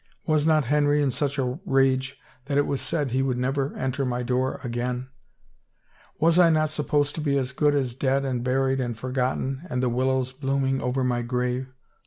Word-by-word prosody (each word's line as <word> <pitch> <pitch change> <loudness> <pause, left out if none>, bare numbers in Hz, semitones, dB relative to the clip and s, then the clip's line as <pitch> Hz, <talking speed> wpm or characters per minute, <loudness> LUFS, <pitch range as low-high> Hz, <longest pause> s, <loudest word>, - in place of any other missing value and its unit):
Was 155 -1 +2
not 155 -3 +3
Henry 145 +2 +2
in 140 -2 +2
such 140 +1 -2
a 130 +1 -1
rage 135 -4 +1 0.3
that 140 0 -2
'twas 140 -1 +1
said 145 -6 -1
he 130 +2 +1
would 130 -2 0
never 135 +2 -1
enter 130 +1 -2
my 125 -1 -1
door 130 +1 -1
again? 125 +1 -3 1.1
Was 165 +2 +4
I 175 -2 +7
not 155 -1 +2
supposed 145 -1 0
to 160 - -4
be 140 -2 +1
as 130 -2 -1
good 145 +2 +2
as 130 -4 0
dead 135 +2 0
and 125 -3 -2
buried 135 +1 +1
and 120 -3 -2
forgotten 130 +2 -2
and 125 0 -1
the 125 - +2
willows 130 +1 0
blooming 135 0 0
over 125 +2 -1
my 120 -1 0
grave 125 +1 -2
135 Hz, 190 wpm, -25 LUFS, 125-145 Hz, 1.1 s, I